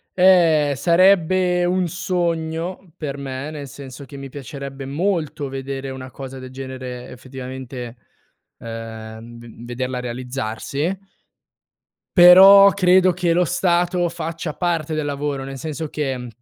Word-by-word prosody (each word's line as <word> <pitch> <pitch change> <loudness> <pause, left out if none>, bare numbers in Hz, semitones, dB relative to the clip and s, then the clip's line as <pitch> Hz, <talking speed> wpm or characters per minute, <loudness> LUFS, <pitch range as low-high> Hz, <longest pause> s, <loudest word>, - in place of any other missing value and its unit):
Eh, 165 -6 +5
sarebbe 180 +2 +3
un 180 0 +1
sogno 170 -1 -3
per 140 -3 -5
me, 135 +1 -5
nel 145 -3 -7
senso 135 0 -10
che 140 +1 -13
mi 135 0 -8
piacerebbe 135 0 -8
molto 155 -2 -2
vedere 135 0 -5
una 130 0 -8
cosa 135 +1 -8
del 130 0 -9
genere 130 -2 -7
effettivamente, 130 -1 -8 0.6
ehm, 115 0 -8
v 120 0 -12
vederla 125 +1 -4
realizzarsi 125 - -3 1.2
però 195 +3 +9
credo 185 -1 +4
che 175 -1 0
lo 180 +1 +3
stato 175 0 +1
faccia 165 -1 -5
parte 165 -2 -1
del 155 - -1
lavoro, 145 -1 -3
nel 135 0 -7
senso 155 +2 -5
che 130 -5 -3
145 Hz, 125 wpm, -21 LUFS, 130-175 Hz, 1.2 s, però